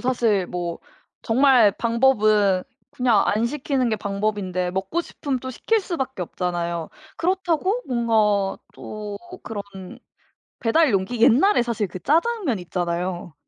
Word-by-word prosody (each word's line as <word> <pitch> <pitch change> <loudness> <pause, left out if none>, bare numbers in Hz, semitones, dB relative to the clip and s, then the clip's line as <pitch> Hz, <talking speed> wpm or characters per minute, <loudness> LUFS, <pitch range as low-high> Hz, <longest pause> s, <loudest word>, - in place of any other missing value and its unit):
사실 230 -7 +1
뭐 175 -1 -4 0.4
정말 245 -3 +5
방법은 215 -6 +3 0.3
그냥 240 -5 +2
안 220 +3 +1
시키는 270 -2 -1
게 215 - 0
방법인데 200 -3 -2
먹고 190 - -2
싶으면 275 -5 -4
또 260 - -5
시킬 445 - 0
수밖에 270 - -4
없잖아요. 170 -2 -3 0.3
그렇다고 370 +5 0
뭔가 215 -5 +1 0.2
또 210 -1 -7 0.2
그런 210 -3 -5 1.0
배달 275 +5 +3
용기 195 +5 -1
옛날에 275 - +5
사실 230 -4 -2
그 185 - -7
짜장면 330 - +1
있잖아요. 175 -1 -3
225 Hz, 265 characters per minute, -23 LUFS, 190-265 Hz, 1.0 s, 정말